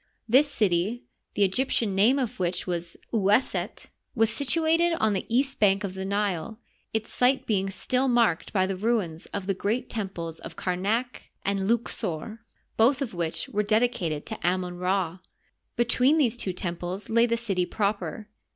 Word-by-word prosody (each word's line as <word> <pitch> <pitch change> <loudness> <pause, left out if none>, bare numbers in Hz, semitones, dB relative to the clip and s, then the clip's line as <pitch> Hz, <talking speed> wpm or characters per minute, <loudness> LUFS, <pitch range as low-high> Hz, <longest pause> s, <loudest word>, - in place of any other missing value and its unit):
This 265 +6 +5
city, 205 0 +1 0.3
the 200 -1 +4
Egyp 255 +8 0
tian 215 -4 +1
name 215 +8 +4
of 250 -4 -2
which 180 0 -1
was 170 -1 -4 0.2
Oueset, 210 +3 +1 0.3
was 225 -1 +3
situated 325 +4 +2
on 220 -10 +1
the 190 - -3
east 270 +4 +1
bank 200 -1 +4
of 195 -2 -3
the 190 0 -5
Nile, 200 0 -1 0.3
its 220 0 -3
site 255 +2 +2
being 195 -3 0
still 255 +6 0
marked 235 -9 +2
by 190 -3 +2
the 195 0 -2
ruins 190 -6 -1
of 200 -2 -5
the 195 - +1
great 210 +6 -2
temples 180 -7 -4
of - - -9
Kamak 205 +7 -2 0.2
and 195 0 0
Louqsor, 220 -3 -2 0.4
both 255 +5 +4
of 240 - -6
which 170 -2 -2
were 210 - 0
dedicatea 210 -8 +1
to - - -6
Amon 180 0 0
Rd, 185 -1 0 0.6
Between 250 +5 +3
these 245 -7 +3
two 205 -5 -2
temples 180 +1 -4
lay 230 +1 +4
the 235 0 +1
city 195 -6 -1
proper. 200 -1 -2
205 Hz, 165 wpm, -26 LUFS, 185-240 Hz, 0.6 s, This